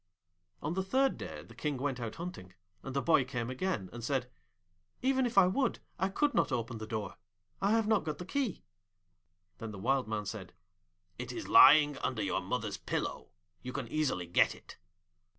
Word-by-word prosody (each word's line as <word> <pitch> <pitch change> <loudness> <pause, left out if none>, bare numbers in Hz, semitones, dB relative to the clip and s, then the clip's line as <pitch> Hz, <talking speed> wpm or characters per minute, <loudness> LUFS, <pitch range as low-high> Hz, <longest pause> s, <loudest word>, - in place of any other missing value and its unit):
On 150 - -1
the 190 - 0
third 265 +8 +2
day - - -7
the - - -15
King 150 -3 -2
went 135 -1 -2
out 115 -2 -4
hunting, 160 - -8 0.3
and 135 - -7
the 140 - +1
boy 160 -5 +4
came 125 -2 -4
again, 130 - -2
and 120 -1 -7
said, 130 0 0 0.8
'Even 260 -1 +3
if 235 - -7
I 195 - +9
would, 235 +7 +1 0.2
I 190 +2 +1
could 290 +8 +1
not - - +2
open 115 -2 -2
the 110 - -6
door. 105 -4 -4 0.4
I 200 +2 +3
have 225 -1 +3
not 215 -2 +3
got 155 -2 -3
the 180 - -7
key.' 255 - -2 1.0
Then 115 - -5
the 105 - -8
Wild 130 +5 +1
Man 105 -1 -2
said, 100 -3 -6 0.7
'It - - -4
is - - -6
lying 145 -2 +7
under - - -1
your - - 0
mother's - - -3
pillow. - - -3 0.3
You 125 - -6
can 135 -4 -4
easily 145 -12 0
get 85 - +3
it.' - - -14
140 Hz, 190 wpm, -32 LUFS, 115-190 Hz, 1.0 s, I